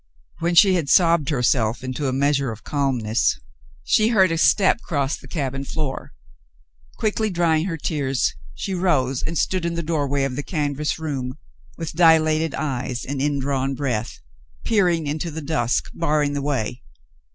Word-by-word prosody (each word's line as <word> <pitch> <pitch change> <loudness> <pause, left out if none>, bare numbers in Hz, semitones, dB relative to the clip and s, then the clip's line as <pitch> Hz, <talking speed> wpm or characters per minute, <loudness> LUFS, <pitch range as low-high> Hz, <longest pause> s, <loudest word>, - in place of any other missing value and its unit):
When 170 +1 0
she 190 +2 +7
had 165 -6 0
sobbed 170 -4 +4
herself 125 -4 +1
into 130 +2 -3
a - - 0
measure 140 -1 +1
of 110 -1 -10
calmness, 125 -6 0 0.4
she 215 - +3
heard 190 -6 +4
a 165 - 0
step 180 - +4
cross 140 -2 -1
the - - -14
cabin 135 -4 -3
floor. 140 - -5 0.8
Quickly 215 0 0
drying 170 -3 +1
her 170 -4 -3
tears, 135 -4 -1 0.2
she 195 - -4
rose 135 -9 +1
and 165 +1 -3
stood 185 +4 0
in 170 0 -1
the 170 - -2
doorway 145 -4 0
of 135 -2 -2
the 145 - -2
canvas 150 -2 -2
room, 135 -4 -4 0.4
with 165 -2 -5
dilated 160 -2 +4
eyes 130 -4 -3
and 135 0 -3
indrawn 135 -1 0
breath, 125 -5 -2 0.5
peering 180 -7 +2
into 155 +4 -3
the 160 0 -6
dusk, 140 -6 -1
barring 145 -1 0
the 145 - -2
way. 130 -4 -2
145 Hz, 160 wpm, -22 LUFS, 135-165 Hz, 0.8 s, she